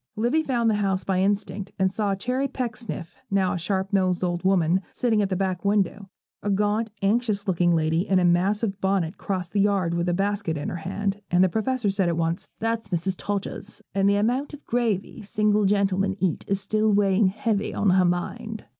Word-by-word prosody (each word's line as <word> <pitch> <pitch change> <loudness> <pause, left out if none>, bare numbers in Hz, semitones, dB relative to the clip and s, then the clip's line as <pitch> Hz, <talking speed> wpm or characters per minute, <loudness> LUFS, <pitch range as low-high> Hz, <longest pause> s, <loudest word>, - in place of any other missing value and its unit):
Livy 240 +9 +2
found 245 -6 0
the 220 - +4
house 195 -1 0
by 185 -1 0
instinct; 200 0 -1
and 190 -1 +2
saw 205 -2 0
Cherry 255 +7 -1
Pecksniff, 230 - -5
now 195 -2 +1
a - - -2
sharp 190 +2 -2
nosed 185 -2 +2
old 175 -1 -1
woman, 185 -1 +3
sitting 225 -4 +1
at 200 - 0
the 190 - 0
back 185 -2 -1
window. 200 -1 0 0.3
A 205 - -2
gaunt, 210 +3 +1
anxious 210 -1 +1
looking 175 -2 +3
lady, 160 +4 +1
in 190 - +3
a 180 - +3
massive 195 +4 +1
bonnet, 190 -2 0
crossed 185 -3 -3
the 205 - +1
yard, 195 -4 +1
with 170 +1 0
a - - +1
basket 200 -4 -1
in 145 - -3
her - - -4
hand; 195 +3 -3
and 175 +1 +4
the 185 - +4
Professor 220 +2 0
said 190 -2 +1
at 170 - -1
once, 165 +3 -1
'That's 225 0 -2
Mrs. 180 +1 -1
Todgers, 205 +2 -5
and 195 0 +3
the 200 - +3
amount 250 +8 0
of 295 - -18
gravy 225 -3 -1
single 210 0 +1
gentlemen 195 -1 +1
eat 185 -4 -1
is 195 0 0
still 215 +2 +1
weighing 200 0 +3
heavy 210 +1 -1
on 200 -2 +2
her 185 0 +4
mind.' 220 +6 -3
195 Hz, 200 wpm, -25 LUFS, 185-210 Hz, 0.3 s, the